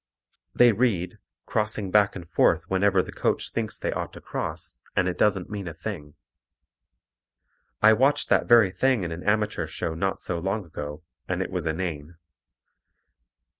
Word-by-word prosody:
They 120 Hz, -1 st, +7 dB
read, 100 Hz, -6 st, 0 dB, 0.3 s
crossing 105 Hz, -3 st, -2 dB
back 105 Hz, 0 st, +4 dB
and 90 Hz, -3 st, -8 dB
forth 85 Hz, -, +3 dB
whenever 95 Hz, 0 st, +2 dB
the -, -, -9 dB
coach -, -, -1 dB
thinks -, -, -3 dB
they -, -, -2 dB
ought -, -, -4 dB
to -, -, -10 dB
cross, -, -, -6 dB
and 90 Hz, -, +2 dB
it 90 Hz, -, -1 dB
doesn't 95 Hz, -3 st, +1 dB
mean 100 Hz, -3 st, -5 dB
a 85 Hz, -, -6 dB
thing. 80 Hz, -5 st, -7 dB, 1.7 s
I 110 Hz, +1 st, +8 dB
watched 135 Hz, +6 st, +2 dB
that -, -, +3 dB
very 115 Hz, -5 st, +6 dB
thing 130 Hz, 0 st, +1 dB
in 85 Hz, -, -3 dB
an 80 Hz, +1 st, -5 dB
amateur 105 Hz, -5 st, 0 dB
show 80 Hz, +1 st, -4 dB
not 95 Hz, +4 st, -1 dB
so 85 Hz, -2 st, -3 dB
long 95 Hz, +3 st, -2 dB
ago, 75 Hz, 0 st, -7 dB, 0.2 s
and 90 Hz, -1 st, -1 dB
it -, -, -8 dB
was 90 Hz, -3 st, -3 dB
inane. 80 Hz, -1 st, -3 dB
95 Hz, 165 wpm, -26 LUFS, 85-105 Hz, 1.7 s, I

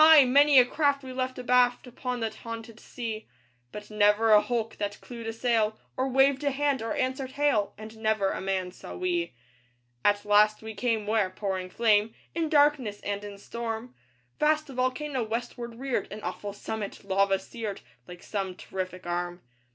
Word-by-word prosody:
many 280 Hz, +2 st, +6 dB
a 250 Hz, -, +9 dB
craft 285 Hz, +1 st, +1 dB
we 260 Hz, -1 st, -7 dB
left 255 Hz, 0 st, -2 dB
abaft 250 Hz, 0 st, +3 dB
Upon 250 Hz, 0 st, -4 dB
that 220 Hz, -1 st, -3 dB
haunted 230 Hz, 0 st, -8 dB
sea; 225 Hz, -3 st, -6 dB, 0.4 s
But 210 Hz, 0 st, -9 dB
never 210 Hz, +1 st, +4 dB
a 210 Hz, -1 st, +8 dB
hulk 230 Hz, -2 st, -2 dB
that 205 Hz, 0 st, -3 dB
clewed 235 Hz, -2 st, -8 dB
a -, -, -1 dB
sail, 225 Hz, -2 st, +1 dB, 0.2 s
Or 260 Hz, +1 st, 0 dB
waved 270 Hz, +1 st, +3 dB
a 285 Hz, -, +3 dB
hand, 280 Hz, -1 st, 0 dB
or 225 Hz, 0 st, -2 dB
answered 260 Hz, 0 st, -2 dB
hail, 280 Hz, -9 st, +1 dB
And 215 Hz, +1 st, -9 dB
never 215 Hz, -3 st, +1 dB
a -, -, -4 dB
man 190 Hz, -1 st, -1 dB
saw -, -, -10 dB
we. 355 Hz, -, -1 dB, 0.7 s
At 205 Hz, 0 st, +3 dB
last 210 Hz, +1 st, +4 dB
we 220 Hz, 0 st, -6 dB
came 220 Hz, 0 st, 0 dB
where 210 Hz, -2 st, +2 dB
pouring 185 Hz, -1 st, -3 dB
flame 215 Hz, +1 st, +2 dB, 0.2 s
In 325 Hz, -1 st, -1 dB
darkness 290 Hz, -9 st, +3 dB
and 200 Hz, 0 st, -3 dB
in 205 Hz, -1 st, -8 dB
storm, 230 Hz, +3 st, -5 dB, 0.5 s
Vast 305 Hz, -1 st, +2 dB
a -, -, -9 dB
volcano 255 Hz, +2 st, -1 dB
westward 235 Hz, +1 st, -4 dB
reared 260 Hz, -3 st, -2 dB
An 210 Hz, +1 st, -7 dB
awful 205 Hz, -, -4 dB
summit, 210 Hz, 0 st, -5 dB
lava 195 Hz, 0 st, +2 dB
seared, 205 Hz, +1 st, -6 dB, 0.3 s
Like 180 Hz, 0 st, -11 dB
some 195 Hz, -3 st, -3 dB
terrific 185 Hz, -1 st, -6 dB
arm. 175 Hz, 0 st, -3 dB
225 Hz, 175 wpm, -28 LUFS, 205-255 Hz, 0.7 s, a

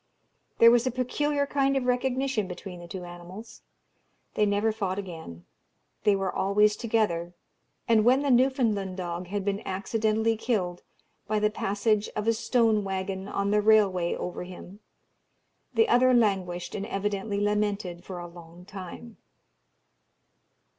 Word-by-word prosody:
There 230 Hz, 0 st, +8 dB
was 240 Hz, +1 st, +3 dB
a -, -, +3 dB
peculiar 285 Hz, +4 st, 0 dB
kind 275 Hz, -1 st, +1 dB
of 265 Hz, -, 0 dB
recognition 250 Hz, -2 st, 0 dB
between 180 Hz, 0 st, -8 dB
the 175 Hz, -, -10 dB
two 180 Hz, +1 st, -7 dB
animals; 180 Hz, +6 st, -11 dB, 0.7 s
they 210 Hz, -, +2 dB
never 205 Hz, +2 st, +1 dB
fought 195 Hz, -4 st, -3 dB
again; 160 Hz, -, -8 dB, 0.6 s
they 205 Hz, -2 st, +5 dB
were 195 Hz, -1 st, -2 dB
always 210 Hz, +2 st, +3 dB
together: 210 Hz, -7 st, -1 dB, 0.5 s
and 225 Hz, -2 st, +4 dB
when 255 Hz, +4 st, +4 dB
the 280 Hz, -, +2 dB
Newfoundland 235 Hz, -7 st, +2 dB
dog 175 Hz, 0 st, -4 dB
had 200 Hz, +1 st, -3 dB
been 200 Hz, 0 st, -1 dB
accidentally 220 Hz, +3 st, 0 dB
killed 210 Hz, -6 st, -2 dB, 0.5 s
by 215 Hz, -, 0 dB
the 210 Hz, 0 st, +2 dB
passage 205 Hz, +1 st, 0 dB
of 210 Hz, +1 st, -2 dB
a 230 Hz, -, +4 dB
stone 225 Hz, -2 st, +2 dB
waggon 190 Hz, 0 st, -3 dB
on 200 Hz, 0 st, -1 dB
the 210 Hz, 0 st, +3 dB
railway 200 Hz, -5 st, +3 dB
over 180 Hz, -, -5 dB
him, 185 Hz, +2 st, -11 dB, 1.0 s
the 450 Hz, -, +4 dB
other 255 Hz, -5 st, +4 dB
languished 190 Hz, -6 st, 0 dB
and 200 Hz, 0 st, -4 dB
evidently 200 Hz, +1 st, -2 dB
lamented 205 Hz, -4 st, -1 dB
for 185 Hz, -, -7 dB
a 175 Hz, -, -6 dB
long 170 Hz, 0 st, -14 dB
time. 195 Hz, +4 st, -9 dB
205 Hz, 145 wpm, -27 LUFS, 185-225 Hz, 1.0 s, There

